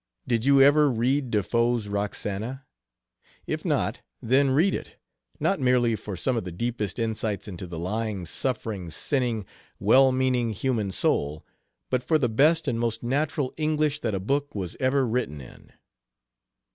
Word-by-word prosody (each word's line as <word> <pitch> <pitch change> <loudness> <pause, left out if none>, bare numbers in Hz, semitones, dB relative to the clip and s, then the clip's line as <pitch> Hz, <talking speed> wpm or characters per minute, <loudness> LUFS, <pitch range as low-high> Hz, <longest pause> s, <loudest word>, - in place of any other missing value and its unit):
Did 120 -1 0
you 140 0 +5
ever 145 +1 +5
read 130 +3 0
De 105 -3 +1
Foe's 115 0 +1
'Roxana'? 105 +5 -3 0.8
If - - -3
not, - - 0 0.2
then 135 +4 +3
read 160 +9 +3
it, - - -5 0.4
not 195 - +1
merely 125 -3 +3
for 105 -2 -6
some 125 +8 0
of 115 - -1
the 90 - -6
deepest 110 +1 -3
insights 110 -3 -2
into 90 -2 -7
the 85 -1 -7
lying, 100 +2 -3
suffering, 105 -2 -3
sinning, 120 - -1 0.3
well 130 +7 +5
meaning 130 -3 +1
human 110 -2 -1
soul, 75 -5 0 0.5
but 130 -1 +1
for 160 +4 +2
the 125 -6 +1
best 150 +8 +3
and 120 -4 0
most 115 -1 -2
natural 140 +1 -1
English 155 -1 0
that 110 - -2
a - - -1
book 140 +8 -1
was 95 -4 -4
ever 130 0 +2
written 115 -11 -2
in." 65 - -14
120 Hz, 160 wpm, -26 LUFS, 105-135 Hz, 0.8 s, you